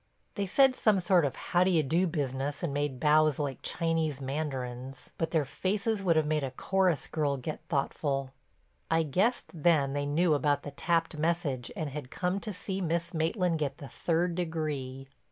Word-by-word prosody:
They 200 -1 -2
said 265 +7 +5
some 215 -5 +3
sort 175 -2 +3
of 140 - -2
"How 175 0 +1
d'ye 175 -4 +3
do" 170 +7 +2
business 140 -2 -2
and 155 -5 -1
made 145 -3 -1
bows 155 0 +4
like 140 -3 -3
Chinese 160 -4 0
mandarins, 135 -2 -4
but 165 - 0
their 160 -4 +1
faces 200 - -1
would 175 -4 +3
have 155 -1 +3
made 150 -1 0
a 135 - -1
chorus 180 +4 +1
girl 145 -3 -1
get 150 +4 -5
thoughtful. 140 -2 -1 0.6
I 165 0 +3
guessed 190 - 0
then 150 -4 +2
they 145 0 -1
knew 160 +3 +3
about 145 -1 +1
the 145 - -6
tapped 165 +1 0
message 155 -6 -1
and 155 -3 -3
had 140 -2 -6
come 180 +6 -1
to 210 - -5
see 190 0 -4
Miss 170 0 -1
Maitland 165 +1 0
get 145 -3 -2
the 140 - -8
third 170 +1 0
degree. 150 -6 -3
155 Hz, 180 wpm, -30 LUFS, 140-175 Hz, 0.6 s, said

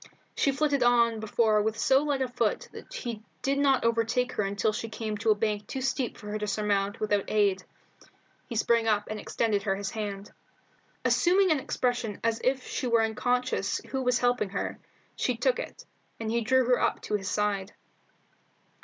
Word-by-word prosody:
She 280 - +2
flitted 285 0 +1
on 235 -2 +4
before 215 0 +2
with 220 +1 -1
so 265 +4 +4
light 285 -3 0
a - - -1
foot 235 -3 -1
that - - -11
he 240 - -5 0.2
did 275 +1 +1
not 270 -4 +3
overtake 230 +2 +1
her - - -1
until 200 +1 0
she 225 +1 -4
came 220 -1 -4
to 225 +1 0
a 215 - +6
bank 210 -1 -1
too 265 - -4
steep 260 -1 -1
for 210 -1 -8
her 215 - -2
to 210 - -3
surmount 205 0 0
without 205 -2 0
aid. 200 -3 +2 0.8
He 235 - -6
sprang 230 +1 +2
up 210 -1 +1
and 215 - -4
extended 210 -1 0
her 195 -1 0
his 195 0 -4
hand. 205 -2 -5 0.7
Assuming 370 +1 +4
an 305 - +3
expression 245 -5 -2
as 230 0 0
if 260 0 +1
she 255 - -3
were 230 -1 +3
unconscious 245 +3 0
who 265 - -1
was 250 -1 +2
helping 245 -4 +1
her, 195 - -4 0.4
she - - -1
took - - +1
it, - - -7 0.3
and 220 -1 -3
he 235 +1 +1
drew 260 +3 +3
her 250 0 +3
up - - 0
to - - -5
his 195 -2 -1
side. 205 -2 -1
225 Hz, 190 wpm, -28 LUFS, 210-250 Hz, 0.8 s, a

